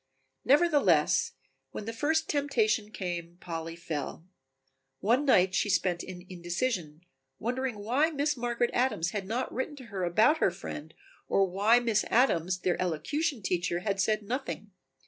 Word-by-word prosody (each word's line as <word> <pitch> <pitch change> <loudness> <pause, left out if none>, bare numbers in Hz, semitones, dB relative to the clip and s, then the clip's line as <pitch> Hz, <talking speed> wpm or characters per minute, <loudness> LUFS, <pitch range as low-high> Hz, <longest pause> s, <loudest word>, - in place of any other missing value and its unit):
Nevertheless, 295 +2 +3 0.4
when 210 - -5
the 230 - -4
first 315 +6 +1
temptation 230 -8 +1
came 175 -4 -5
Polly 165 -2 -5
fell. 160 -1 -5 0.7
One 240 - +2
night 185 -8 +4
she 205 - +1
spent 180 -2 +1
in 180 -1 -9
indecision, 175 -2 -3 0.4
wondering 250 0 -2
why 250 +10 +1
Miss 295 -1 0
Margaret 240 -1 -1
Adams 240 -9 +1
had 200 -3 -4
not 235 +5 -2
written 260 +4 -3
to 260 -3 -11
her 190 -2 -2
about 215 - +4
her - - +4
friend 160 -3 -8 0.3
or 195 - +3
why 205 +6 +4
Miss 230 -3 +1
Adams, 185 -7 +2
their 180 0 0
elocution 220 - -1
teacher, 175 -1 -1
had 195 -1 0
said 215 +1 +1
nothing. 225 -2 -4
210 Hz, 145 wpm, -29 LUFS, 180-255 Hz, 0.7 s, night